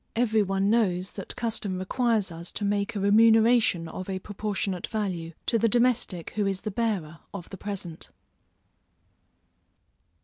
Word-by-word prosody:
Every 225 Hz, -2 st, +3 dB
one 195 Hz, 0 st, +1 dB
knows 190 Hz, -5 st, +1 dB
that 195 Hz, -, -5 dB
custom 220 Hz, -5 st, -2 dB
requires 215 Hz, +1 st, +1 dB
us 170 Hz, +1 st, -5 dB
to 205 Hz, -, -2 dB
make 205 Hz, +2 st, 0 dB
a -, -, -1 dB
remuneration 220 Hz, -3 st, +4 dB
of 185 Hz, +3 st, -7 dB
a 190 Hz, -, -2 dB
proportionate 200 Hz, -1 st, -3 dB
value, 180 Hz, -6 st, -3 dB
to 230 Hz, -, +2 dB
the 230 Hz, +1 st, +3 dB
domestic 235 Hz, -7 st, +1 dB
who 210 Hz, -2 st, 0 dB
is 195 Hz, -1 st, -1 dB
the 215 Hz, -, -4 dB
bearer 190 Hz, -8 st, -2 dB, 0.2 s
of 175 Hz, -4 st, -7 dB
the 195 Hz, -, -7 dB
present. 185 Hz, -5 st, -5 dB
200 Hz, 145 wpm, -27 LUFS, 185-225 Hz, 0.2 s, remuneration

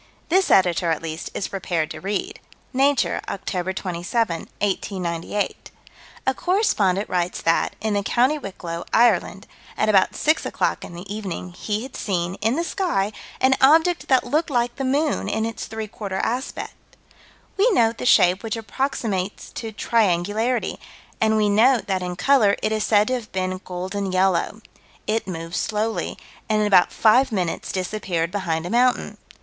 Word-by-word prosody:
This 380 Hz, +3 st, +3 dB
Editor, 175 Hz, -2 st, +3 dB
at 160 Hz, 0 st, -1 dB
least, 160 Hz, 0 st, -5 dB
is 195 Hz, -, -2 dB
prepared 175 Hz, -5 st, -2 dB
to -, -, -7 dB
read 195 Hz, +1 st, -3 dB, 0.3 s
Nature, 275 Hz, +1 st, +2 dB
Oct. 185 Hz, -1 st, -3 dB
27, 180 Hz, 0 st, -2 dB
1898: 190 Hz, -1 st, -2 dB, 0.6 s
A 265 Hz, -, +2 dB
correspondent 215 Hz, -, +1 dB
writes 180 Hz, 0 st, -1 dB
that, 165 Hz, 0 st, +1 dB
in 215 Hz, 0 st, -1 dB
the 205 Hz, -, +1 dB
County 255 Hz, +9 st, +2 dB
Wicklow, 175 Hz, -6 st, -6 dB
Ireland, 220 Hz, -3 st, +3 dB, 0.3 s
at 215 Hz, -, +1 dB
about 195 Hz, -3 st, +4 dB
6 310 Hz, +2 st, +2 dB
o'clock -, -, -1 dB
in 175 Hz, -, -9 dB
the 175 Hz, +2 st, -8 dB
evening, 185 Hz, -4 st, -5 dB
he 210 Hz, +4 st, -3 dB
had 260 Hz, -, -9 dB
seen, 175 Hz, -3 st, -2 dB
in 225 Hz, +4 st, +2 dB
the 335 Hz, -, 0 dB
sky, 335 Hz, -, -1 dB, 0.3 s
an 260 Hz, 0 st, +4 dB
object 320 Hz, +5 st, +4 dB
that 260 Hz, -2 st, +4 dB
looked 315 Hz, +3 st, 0 dB
like 240 Hz, -2 st, 0 dB
the 270 Hz, -, -2 dB
moon 285 Hz, +3 st, 0 dB
in 220 Hz, +1 st, 0 dB
its 230 Hz, -, -5 dB
three 220 Hz, -1 st, -5 dB
quarter 200 Hz, -2 st, -5 dB
aspect. 250 Hz, +7 st, -3 dB, 0.8 s
We 415 Hz, +5 st, +4 dB
note 230 Hz, -, +2 dB
the -, -, -4 dB
shape 180 Hz, -5 st, +5 dB
which 225 Hz, 0 st, -3 dB
approximates 220 Hz, -4 st, -3 dB
to 225 Hz, -2 st, -6 dB
triangularity, 215 Hz, +2 st, 0 dB, 0.4 s
and 220 Hz, 0 st, +3 dB
we 210 Hz, -1 st, +3 dB
note 230 Hz, +5 st, +4 dB
that 190 Hz, -2 st, -1 dB
in 180 Hz, 0 st, -4 dB
color 215 Hz, -1 st, +4 dB
it 215 Hz, -, +1 dB
is 215 Hz, -1 st, 0 dB
said 210 Hz, +1 st, +3 dB
to -, -, 0 dB
have 235 Hz, -4 st, -4 dB
been 185 Hz, 0 st, -2 dB
golden 190 Hz, +2 st, -4 dB
yellow. 190 Hz, +3 st, +1 dB, 0.4 s
It 220 Hz, -1 st, -1 dB
moved 165 Hz, -1 st, -5 dB
slowly, 220 Hz, +1 st, -2 dB, 0.3 s
and 215 Hz, -1 st, +2 dB
in 210 Hz, -, +2 dB
about 190 Hz, -4 st, +5 dB
five 250 Hz, +4 st, +4 dB
minutes 180 Hz, -5 st, -2 dB
disappeared 185 Hz, -3 st, -2 dB
behind 170 Hz, -5 st, -2 dB
a 175 Hz, -, -4 dB
mountain. 245 Hz, +1 st, +1 dB
210 Hz, 165 wpm, -23 LUFS, 185-240 Hz, 0.8 s, shape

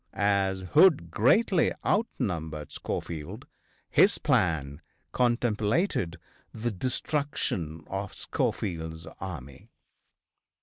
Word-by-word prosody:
As 100 Hz, -2 st, +1 dB
Hood 140 Hz, -, +5 dB
greatly 165 Hz, -, +3 dB
outnumbered 85 Hz, -, -1 dB
Schofield, 80 Hz, -3 st, -5 dB, 0.4 s
his -, -, +5 dB
plan 75 Hz, -4 st, +1 dB, 0.3 s
contemplated 120 Hz, -, +1 dB, 0.3 s
the 115 Hz, +2 st, -3 dB
destruction 105 Hz, -, -2 dB
of 95 Hz, 0 st, -5 dB
Schofield's 80 Hz, -2 st, -3 dB
army. 70 Hz, -9 st, -8 dB
95 Hz, 75 wpm, -28 LUFS, 80-120 Hz, 0.4 s, Hood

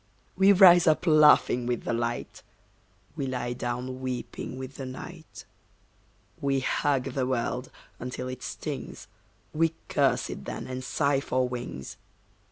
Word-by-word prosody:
We 195 Hz, +2 st, +6 dB
rise 180 Hz, -3 st, +8 dB
up 155 Hz, +3 st, +3 dB
laughing 150 Hz, -6 st, +5 dB
with 120 Hz, -2 st, -1 dB
the -, -, -2 dB
light, 120 Hz, 0 st, -3 dB, 0.7 s
We 135 Hz, -, -3 dB
lie 125 Hz, -1 st, -2 dB
down 125 Hz, +1 st, -4 dB
weeping 130 Hz, 0 st, -5 dB
with 130 Hz, +1 st, -8 dB
the 135 Hz, -, -5 dB
night. 160 Hz, +5 st, -10 dB, 1.0 s
We 135 Hz, -1 st, +1 dB
hug 135 Hz, -1 st, 0 dB
the 130 Hz, -1 st, -1 dB
world 125 Hz, 0 st, -2 dB, 0.3 s
until 125 Hz, +1 st, -5 dB
it 130 Hz, 0 st, -6 dB
stings, -, -, -6 dB, 0.5 s
We 165 Hz, +1 st, +1 dB
curse -, -, +1 dB
it -, -, -8 dB
then -, -, -5 dB
and 130 Hz, 0 st, -5 dB
sigh 140 Hz, +1 st, +1 dB
for 130 Hz, -2 st, 0 dB
wings. 120 Hz, -, -6 dB
130 Hz, 140 wpm, -27 LUFS, 125-150 Hz, 1.0 s, rise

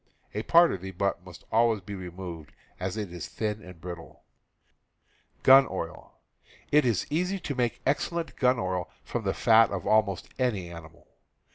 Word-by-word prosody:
A 105 Hz, -, -2 dB
part 170 Hz, +7 st, +5 dB
of 95 Hz, -, -5 dB
the 95 Hz, -, -6 dB
butt 95 Hz, -1 st, -2 dB
must 90 Hz, -2 st, -13 dB
always 115 Hz, -1 st, +3 dB
be 100 Hz, +2 st, -8 dB
removed, 90 Hz, -4 st, -8 dB, 0.3 s
as 95 Hz, +3 st, -3 dB
it 100 Hz, -5 st, -4 dB
is 85 Hz, -, -6 dB
thin 110 Hz, -1 st, -3 dB
and 90 Hz, -3 st, -12 dB
brittle. 85 Hz, -1 st, -9 dB, 1.2 s
It 135 Hz, +2 st, +2 dB
is 115 Hz, -7 st, +1 dB
easy 180 Hz, +5 st, 0 dB
to 145 Hz, -, -4 dB
make 120 Hz, -3 st, -1 dB
excellent 165 Hz, +4 st, -1 dB
gun 125 Hz, -1 st, +3 dB
oil 90 Hz, -4 st, -2 dB
from -, -, -4 dB
the -, -, 0 dB
fat 115 Hz, 0 st, +5 dB
of 100 Hz, -3 st, -4 dB
almost 110 Hz, -4 st, +2 dB
any 105 Hz, -9 st, -1 dB
animal. 85 Hz, -1 st, -12 dB
100 Hz, 155 wpm, -28 LUFS, 90-125 Hz, 1.2 s, part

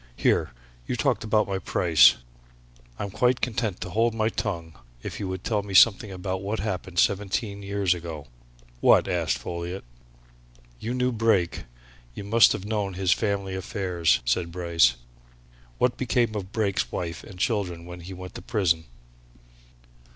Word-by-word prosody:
"Here! -, -, +2 dB, 0.4 s
You -, -, -1 dB
talked 120 Hz, -2 st, 0 dB
about 110 Hz, -1 st, +2 dB
my 95 Hz, -1 st, -2 dB
price. 85 Hz, -2 st, +5 dB, 0.8 s
I'm 100 Hz, -1 st, -4 dB
quite 125 Hz, +4 st, +2 dB
content 110 Hz, -5 st, -2 dB
to 90 Hz, -, -5 dB
hold 115 Hz, +1 st, +1 dB
my 110 Hz, 0 st, +1 dB
tongue 85 Hz, -8 st, -4 dB, 0.3 s
if -, -, -6 dB
you'd 95 Hz, -2 st, -4 dB
tell 105 Hz, -3 st, 0 dB
me 100 Hz, -1 st, -6 dB
something 105 Hz, +1 st, +6 dB
about 95 Hz, 0 st, -4 dB
what 105 Hz, +3 st, -3 dB
happened 95 Hz, -4 st, -4 dB
seventeen 100 Hz, +1 st, 0 dB
years 100 Hz, -2 st, +1 dB
ago." 85 Hz, -4 st, -7 dB, 0.5 s
"What?" -, -, +5 dB
asked 80 Hz, -8 st, 0 dB
Folliot. 85 Hz, +7 st, -5 dB, 1.0 s
"You 115 Hz, +3 st, -3 dB
knew 125 Hz, 0 st, +1 dB
Brake, 110 Hz, -7 st, +1 dB, 0.5 s
you -, -, -6 dB
must 110 Hz, +2 st, +5 dB
have 95 Hz, -, -5 dB
known 105 Hz, -3 st, -2 dB
his 95 Hz, -1 st, +1 dB
family 100 Hz, -3 st, 0 dB
affairs," 95 Hz, -3 st, 0 dB
said 85 Hz, +8 st, 0 dB
Bryce. 85 Hz, -7 st, +3 dB, 0.8 s
"What 125 Hz, -1 st, +1 dB
became 120 Hz, -3 st, +1 dB
of 100 Hz, -2 st, -5 dB
Brake's 100 Hz, -, -1 dB
wife 85 Hz, -1 st, -4 dB
and 95 Hz, -, -12 dB
children 90 Hz, -5 st, -1 dB
when 90 Hz, 0 st, -9 dB
he 90 Hz, +2 st, -9 dB
went 90 Hz, 0 st, -9 dB
to -, -, -8 dB
prison?" 85 Hz, -7 st, 0 dB
95 Hz, 150 wpm, -26 LUFS, 90-110 Hz, 1.0 s, something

